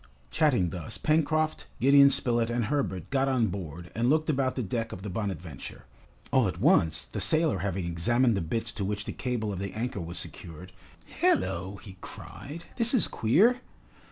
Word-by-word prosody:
Chatting 125 Hz, -, +2 dB
thus, 85 Hz, -5 st, -5 dB
Pencroft, 155 Hz, 0 st, +1 dB
Gideon 140 Hz, +2 st, +7 dB
Spilett, 120 Hz, -3 st, +1 dB
and 120 Hz, -1 st, 0 dB
Herbert 120 Hz, -, -2 dB
got 135 Hz, 0 st, +2 dB
on 120 Hz, -5 st, +2 dB
board 85 Hz, -3 st, -7 dB
and 120 Hz, +2 st, +1 dB
looked 155 Hz, +1 st, +2 dB
about 130 Hz, -2 st, 0 dB
the 125 Hz, -, -2 dB
deck 115 Hz, +3 st, -3 dB
of 95 Hz, -, -8 dB
the 105 Hz, -, -5 dB
"Bonadventure." 90 Hz, -, -5 dB, 0.5 s
All -, -, +4 dB
at -, -, -4 dB
once, 80 Hz, -1 st, +3 dB
the -, -, -5 dB
sailor 155 Hz, -, +2 dB
having 95 Hz, -1 st, -2 dB
examined 115 Hz, +8 st, +2 dB
the 95 Hz, -, -1 dB
bitts 110 Hz, +7 st, -2 dB
to 105 Hz, -, -4 dB
which 105 Hz, +1 st, -3 dB
the -, -, -4 dB
cable 115 Hz, -5 st, -2 dB
of 90 Hz, -, -5 dB
the 100 Hz, 0 st, -4 dB
anchor 115 Hz, -2 st, -3 dB
was 85 Hz, +1 st, -5 dB
secured, 85 Hz, 0 st, -7 dB, 0.5 s
"Hallo," 290 Hz, -, +1 dB
he 95 Hz, -3 st, -11 dB
cried, 160 Hz, +4 st, -9 dB
"this 235 Hz, +2 st, +3 dB
is 235 Hz, -, +4 dB
queer!" 215 Hz, -, +3 dB
115 Hz, 180 wpm, -28 LUFS, 95-140 Hz, 0.5 s, Gideon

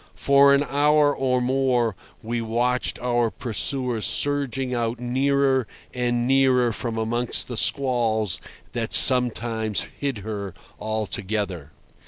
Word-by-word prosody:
For 140 Hz, 0 st, +4 dB
an 140 Hz, -, +1 dB
hour 145 Hz, +1 st, +2 dB
or 125 Hz, -1 st, 0 dB
more 125 Hz, -4 st, 0 dB, 0.3 s
we 115 Hz, +1 st, -3 dB
watched 120 Hz, +3 st, -1 dB
our 120 Hz, -2 st, 0 dB
pursuer 125 Hz, +1 st, -1 dB
surging 135 Hz, -1 st, -1 dB
out 120 Hz, -1 st, -2 dB
nearer 135 Hz, 0 st, 0 dB, 0.3 s
and 120 Hz, -1 st, -1 dB
nearer 130 Hz, -3 st, +2 dB
from 115 Hz, 0 st, -5 dB
amongst 120 Hz, +2 st, -1 dB
the 120 Hz, -, -6 dB
squalls 115 Hz, -6 st, 0 dB, 0.3 s
that 115 Hz, -2 st, -2 dB
sometimes 115 Hz, -4 st, +5 dB, 0.2 s
hid 140 Hz, -4 st, -3 dB
her 100 Hz, -4 st, -6 dB, 0.2 s
altogether. 105 Hz, -, -4 dB
120 Hz, 115 wpm, -23 LUFS, 110-135 Hz, 0.3 s, sometimes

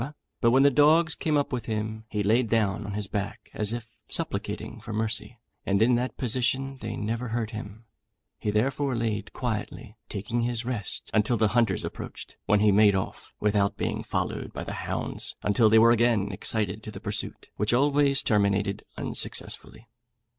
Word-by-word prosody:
but 115 Hz, -, +5 dB
when 130 Hz, +3 st, +5 dB
the 140 Hz, -, +6 dB
dogs 155 Hz, +4 st, +5 dB
came 155 Hz, -2 st, 0 dB
up 145 Hz, -1 st, -1 dB
with 125 Hz, -, -2 dB
him, 110 Hz, 0 st, -3 dB
he 105 Hz, -1 st, -1 dB
laid 115 Hz, +3 st, +3 dB
down 105 Hz, -2 st, +1 dB
on 100 Hz, -, -4 dB
his 105 Hz, 0 st, -1 dB
back, 100 Hz, 0 st, -5 dB
as 105 Hz, 0 st, +1 dB
if 120 Hz, -1 st, -4 dB, 0.2 s
supplicating 115 Hz, -, -3 dB
for 110 Hz, +1 st, -8 dB
mercy, 110 Hz, +2 st, -2 dB, 0.3 s
and 100 Hz, 0 st, +1 dB
in 115 Hz, +3 st, +4 dB
that 125 Hz, +2 st, -1 dB
position 130 Hz, +2 st, 0 dB
they 110 Hz, -1 st, -4 dB
never 115 Hz, +4 st, -2 dB
hurt 115 Hz, -1 st, -2 dB
him; 110 Hz, 0 st, -8 dB, 0.5 s
he -, -, -2 dB
therefore 130 Hz, +5 st, +1 dB
laid 110 Hz, -3 st, -2 dB
quietly, 110 Hz, -2 st, -4 dB
taking 110 Hz, +4 st, -2 dB
his 120 Hz, 0 st, 0 dB
rest, 120 Hz, -4 st, -4 dB
until 110 Hz, +2 st, +3 dB
the 110 Hz, -1 st, +3 dB
hunters 115 Hz, -5 st, +2 dB
approached, -, -, -8 dB
when 105 Hz, 0 st, +4 dB
he 105 Hz, -1 st, +5 dB
made 100 Hz, 0 st, +5 dB
off 95 Hz, -, -4 dB
without 100 Hz, -1 st, +1 dB
being -, -, -2 dB
followed -, -, -3 dB
by -, -, -5 dB
the -, -, -5 dB
hounds, -, -, -4 dB
until 105 Hz, +2 st, +4 dB
they 110 Hz, -, +6 dB
were 115 Hz, +1 st, +7 dB
again 115 Hz, -4 st, +3 dB
excited 105 Hz, +1 st, -1 dB
to 110 Hz, -, -8 dB
the 100 Hz, -3 st, -8 dB
pursuit, 105 Hz, -1 st, -4 dB
which 105 Hz, +1 st, +1 dB
always 140 Hz, +2 st, +3 dB
terminated 100 Hz, -2 st, +1 dB
unsuccessfully. 115 Hz, -, -3 dB
110 Hz, 175 wpm, -27 LUFS, 105-120 Hz, 0.5 s, were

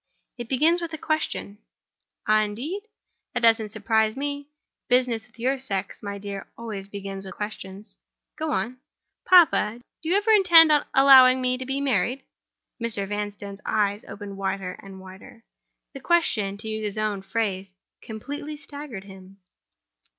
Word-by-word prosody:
"It 240 Hz, -2 st, -8 dB
begins 320 Hz, +6 st, +3 dB
with 335 Hz, -1 st, -5 dB
a -, -, -3 dB
question." 310 Hz, -10 st, -2 dB, 0.7 s
"Ah, 215 Hz, 0 st, +5 dB
indeed? 245 Hz, -, -3 dB, 0.5 s
That -, -, -1 dB
doesn't 225 Hz, -2 st, +3 dB
surprise 220 Hz, +1 st, +1 dB
me. 285 Hz, 0 st, -3 dB, 0.4 s
Business 245 Hz, -3 st, +2 dB
with 235 Hz, -, -24 dB
your 260 Hz, +3 st, 0 dB
sex, 195 Hz, -7 st, -4 dB
my 200 Hz, -1 st, -5 dB
dear, 200 Hz, -1 st, -7 dB
always 210 Hz, -4 st, -6 dB
begins 195 Hz, -1 st, -7 dB
with 190 Hz, -, -9 dB
questions. 205 Hz, -1 st, -7 dB, 0.4 s
Go 315 Hz, 0 st, -3 dB
on." 250 Hz, -1 st, -2 dB, 0.5 s
"Papa! 315 Hz, -11 st, +5 dB, 0.2 s
do 320 Hz, -, -4 dB
you 360 Hz, -, +4 dB
ever 415 Hz, +2 st, +2 dB
intend 340 Hz, -6 st, +7 dB, 0.2 s
allowing 260 Hz, -1 st, +8 dB
me 255 Hz, 0 st, +1 dB
to 255 Hz, 0 st, -7 dB
be 270 Hz, +1 st, -1 dB
married?" 270 Hz, -1 st, 0 dB, 0.6 s
Mr. 215 Hz, -4 st, -3 dB
Vanstone's 205 Hz, 0 st, -5 dB
eyes 205 Hz, -1 st, 0 dB
opened 200 Hz, -1 st, -8 dB
wider 195 Hz, -1 st, -2 dB
and 195 Hz, -1 st, -11 dB
wider. 190 Hz, +4 st, -13 dB, 0.5 s
The 275 Hz, -, -7 dB
question, 245 Hz, -, +1 dB
to 220 Hz, +2 st, -8 dB
use 220 Hz, 0 st, -3 dB
his 210 Hz, 0 st, -4 dB
own 210 Hz, -2 st, -1 dB
phrase, 195 Hz, -2 st, -2 dB, 0.3 s
completely 285 Hz, +7 st, -7 dB
staggered 285 Hz, -7 st, -9 dB
him. 190 Hz, 0 st, -14 dB
220 Hz, 150 wpm, -25 LUFS, 200-275 Hz, 0.7 s, allowing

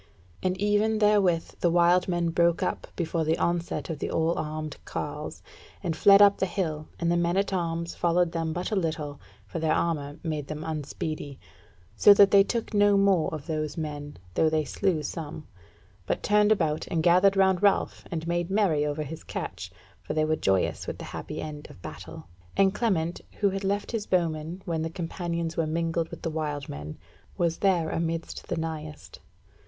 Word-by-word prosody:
And 185 Hz, 0 st, 0 dB
even 210 Hz, +2 st, +2 dB
therewith 205 Hz, -6 st, +2 dB
the 175 Hz, -, +3 dB
wild 175 Hz, +1 st, +4 dB
men 175 Hz, -2 st, 0 dB
broke 170 Hz, 0 st, +2 dB
up -, -, -2 dB
before 165 Hz, -1 st, -1 dB
the 160 Hz, +1 st, +1 dB
onset 170 Hz, 0 st, -1 dB
of 155 Hz, -, -5 dB
the -, -, -2 dB
all 160 Hz, +1 st, +1 dB
armed 155 Hz, -1 st, -4 dB
carles, -, -, -5 dB, 0.4 s
and 165 Hz, -2 st, -1 dB
fled 200 Hz, +5 st, +7 dB
up 200 Hz, -1 st, +5 dB
the 190 Hz, -, +1 dB
hill, 160 Hz, -5 st, -3 dB
and 170 Hz, 0 st, +1 dB
the -, -, +3 dB
men 170 Hz, +1 st, +1 dB
at 195 Hz, 0 st, +1 dB
arms 170 Hz, -1 st, -2 dB
followed 175 Hz, 0 st, +2 dB
them 165 Hz, -1 st, -2 dB
but 175 Hz, +5 st, -3 dB
a -, -, +1 dB
little, 155 Hz, -5 st, -2 dB, 0.2 s
for 165 Hz, -, -5 dB
their 160 Hz, -1 st, +2 dB
armour 145 Hz, -3 st, -1 dB
made 155 Hz, -4 st, -3 dB
them 155 Hz, 0 st, -5 dB
unspeedy; 155 Hz, -2 st, -4 dB, 0.6 s
so 205 Hz, -, +8 dB
that 200 Hz, -1 st, +7 dB
they 200 Hz, -1 st, +7 dB
took 230 Hz, +2 st, -3 dB
no 205 Hz, -1 st, +5 dB
more 195 Hz, -4 st, +3 dB
of 155 Hz, -3 st, -6 dB
those 155 Hz, -2 st, -3 dB
men, 145 Hz, -2 st, -5 dB, 0.2 s
though 160 Hz, -, +3 dB
they 155 Hz, -1 st, +1 dB
slew 165 Hz, +3 st, 0 dB
some, 155 Hz, 0 st, -6 dB, 0.6 s
but -, -, -1 dB
turned 210 Hz, +1 st, +4 dB
about 160 Hz, -7 st, +1 dB
and 165 Hz, -2 st, -1 dB
gathered 185 Hz, +3 st, +5 dB
round 190 Hz, -2 st, +4 dB
Ralph 200 Hz, -1 st, +2 dB
and 165 Hz, -2 st, -4 dB
made 175 Hz, 0 st, -1 dB
merry 190 Hz, -7 st, +2 dB
over 150 Hz, +1 st, -2 dB
his 155 Hz, +2 st, -8 dB
catch, -, -, -6 dB, 0.3 s
for -, -, -5 dB
they 155 Hz, 0 st, +2 dB
were 155 Hz, 0 st, +1 dB
joyous 95 Hz, -9 st, 0 dB
with -, -, -4 dB
the -, -, -8 dB
happy -, -, -5 dB
end 150 Hz, -1 st, -6 dB
of -, -, -14 dB
battle; -, -, -9 dB, 0.3 s
and 195 Hz, -1 st, +4 dB
Clement, 175 Hz, -8 st, 0 dB
who 200 Hz, -2 st, +1 dB
had 195 Hz, +1 st, -4 dB
left 200 Hz, +1 st, -1 dB
his 225 Hz, -3 st, -3 dB
bowmen 170 Hz, 0 st, -1 dB
when 165 Hz, -3 st, -1 dB
the 160 Hz, -, -2 dB
Companions 170 Hz, -1 st, -3 dB
were 165 Hz, -2 st, +1 dB
mingled 165 Hz, +1 st, -1 dB
with -, -, -10 dB
the 165 Hz, -, -1 dB
wild 150 Hz, -2 st, -3 dB
men, 75 Hz, +2 st, -7 dB, 0.4 s
was 170 Hz, -3 st, 0 dB
there 180 Hz, -5 st, +2 dB
amidst 165 Hz, 0 st, -3 dB
the 175 Hz, -, -2 dB
nighest. 155 Hz, -2 st, -6 dB
170 Hz, 190 wpm, -27 LUFS, 155-190 Hz, 0.6 s, so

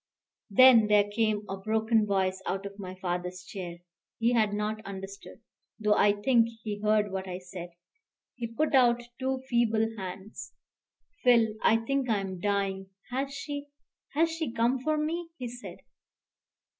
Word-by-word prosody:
Then 230 Hz, 0 st, +7 dB
there 210 Hz, -1 st, +5 dB
came 210 Hz, 0 st, 0 dB
a 195 Hz, -, -4 dB
broken 220 Hz, +2 st, +1 dB
voice 190 Hz, -1 st, 0 dB
out 195 Hz, +1 st, -2 dB
of 200 Hz, +1 st, -8 dB
my 185 Hz, -1 st, -6 dB
father's 180 Hz, 0 st, -4 dB
chair. 175 Hz, -4 st, -7 dB, 0.4 s
He 235 Hz, +1 st, +2 dB
had 220 Hz, -3 st, +3 dB
not 210 Hz, +1 st, -2 dB
understood, 195 Hz, +1 st, -9 dB, 0.4 s
though 210 Hz, -1 st, +3 dB
I 205 Hz, 0 st, +5 dB
think 230 Hz, +3 st, +3 dB, 0.2 s
he 210 Hz, -2 st, -4 dB
heard 210 Hz, -1 st, +2 dB
what 190 Hz, 0 st, -4 dB
I 180 Hz, -1 st, -4 dB
said. 180 Hz, -1 st, -8 dB, 0.6 s
He 240 Hz, -2 st, -4 dB
put 290 Hz, +8 st, -1 dB
out 240 Hz, -2 st, +4 dB, 0.2 s
two 260 Hz, 0 st, -2 dB
feeble 225 Hz, -3 st, +2 dB
hands. 190 Hz, +2 st, -7 dB, 0.7 s
"Phil 235 Hz, -3 st, +5 dB
I 225 Hz, -, +5 dB
think 275 Hz, 0 st, 0 dB
I 220 Hz, -, +3 dB
am 190 Hz, -2 st, -5 dB
dying 195 Hz, -1 st, -1 dB, 0.2 s
has 270 Hz, +2 st, -2 dB
she 285 Hz, +1 st, -5 dB, 0.5 s
has 325 Hz, +2 st, +3 dB
she 320 Hz, -6 st, -3 dB
come 235 Hz, +3 st, +1 dB
for 310 Hz, +4 st, 0 dB
me?" 330 Hz, +3 st, -2 dB
he 250 Hz, -, -4 dB
said. 245 Hz, +1 st, -9 dB
215 Hz, 155 wpm, -29 LUFS, 195-245 Hz, 0.7 s, Then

